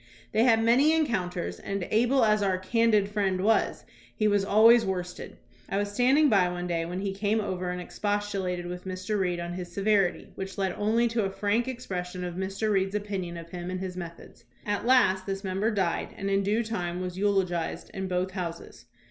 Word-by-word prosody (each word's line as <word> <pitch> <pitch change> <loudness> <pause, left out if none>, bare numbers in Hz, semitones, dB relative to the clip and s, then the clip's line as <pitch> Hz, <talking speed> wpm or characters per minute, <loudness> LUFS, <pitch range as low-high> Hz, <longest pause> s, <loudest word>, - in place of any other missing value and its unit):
They 225 +2 +3
had 225 -3 +4
many 265 +7 +5
encounters, 190 - -1
and, 195 -2 -4
able 240 +3 +3
as 210 -1 +3
our 190 -2 +1
"candid" 215 +1 +2
friend 200 -3 0
was, 215 +4 +1 0.3
he 215 - +2
was 205 -1 +2
always 225 +4 +6
worst 180 -3 -3
ed. - - -9 0.3
I 195 - -1
was 205 0 -1
standing 260 +8 +4
by 195 -8 +4
one 175 0 -4
day 170 -2 -1
when 180 +2 -4
he 195 -1 -2
came 205 +2 0
over 185 -3 -3
and 180 0 -3
expostulated 195 -2 -2
with 180 +1 -6
Mr. 185 +3 -3
Reed 180 -2 0
on 170 0 -4
his 175 -1 -6
severity, 195 -1 +1
which 190 +1 -7
led 190 -1 0
only 225 +3 +2
to 225 -2 0
a - - -1
frank 205 +5 0
expression 180 -8 -5
of 175 -1 -4
Mr. 195 +4 -2
Reed's 195 0 +1
opinion 195 -4 -3
of 170 0 -10
him 175 0 -5
and 185 0 -3
his 185 -1 -5
methods. 170 -2 -9 0.2
At 205 +2 -2
last 195 -7 +4
this 195 0 -3
member 195 +3 0
died 190 -6 -1
and 195 0 -2
in 195 0 +3
due 210 +4 +1
time 180 -6 -3
was 180 -1 -4
eulogized 190 -4 -1
in 190 0 -3
both 185 +1 -1
Houses. 175 -3 -6
195 Hz, 200 wpm, -27 LUFS, 180-215 Hz, 0.3 s, always